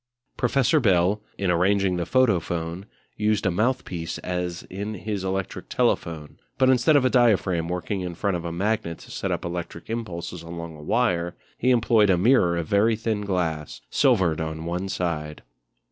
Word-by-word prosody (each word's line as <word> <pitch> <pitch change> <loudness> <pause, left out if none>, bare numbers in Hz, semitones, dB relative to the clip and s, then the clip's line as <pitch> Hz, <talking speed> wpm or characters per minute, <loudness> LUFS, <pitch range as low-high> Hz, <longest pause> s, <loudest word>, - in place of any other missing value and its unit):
Professor 135 +4 +2
Bell, 100 -3 +3 0.2
in 95 -2 +1
arranging 95 +1 +2
the 85 - -2
Photophone, 90 -7 +1 0.3
used 105 -1 +1
a 95 - +3
mouthpiece 90 -6 -1
as 90 -1 -3
in 100 +3 -5
his 100 0 -4
electric 95 0 -3
telephone, 80 -3 -1 0.2
but 130 0 +5
instead 130 +4 +4
of 140 -3 +4
a - - +4
diaphragm 95 -9 +3
working 90 +3 -3
in 90 -1 -4
front 100 +1 0
of 85 - -4
a 85 - -4
magnet 85 -2 -1
to - - -14
set - - -3
up - - -2
electric 85 +2 -5
impulses 90 -7 -5
along 85 -1 -7
a 75 - -11
wire 85 -2 0 0.2
he 125 - 0
employed 115 -4 +4
a 90 - +4
mirror 90 -4 +4
of 85 - -2
very 105 +6 +3
thin 110 -1 -2
glass, 85 -7 -2
silvered 95 - +3
on 80 0 -4
one 90 +3 -3
side. 75 -5 -3
95 Hz, 170 wpm, -25 LUFS, 85-110 Hz, 0.3 s, but